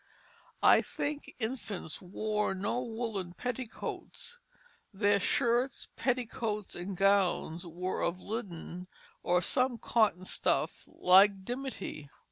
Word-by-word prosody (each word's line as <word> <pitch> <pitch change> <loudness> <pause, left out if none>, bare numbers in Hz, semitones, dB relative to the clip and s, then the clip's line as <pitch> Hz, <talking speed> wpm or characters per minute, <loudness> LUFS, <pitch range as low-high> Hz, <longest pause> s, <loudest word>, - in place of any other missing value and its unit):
I - - +8
think 290 0 -4
infants 220 -8 -4
wore 210 +2 -1
no 205 +6 -1
woollen 225 -7 -3
petticoats; 250 - -5 0.5
their 205 0 +3
shirts, 240 +4 +1
petticoats, 230 -5 -1
and 180 +2 -5
gowns 190 -3 +2
were 180 +3 -3
of 170 +2 0
linen 180 -4 -5 0.3
or 180 0 +2
some 255 +4 +1
cotton 210 -6 +2
stuff - - 0
like 190 +1 +5
dimity. 245 - -5
205 Hz, 100 wpm, -32 LUFS, 185-240 Hz, 0.5 s, I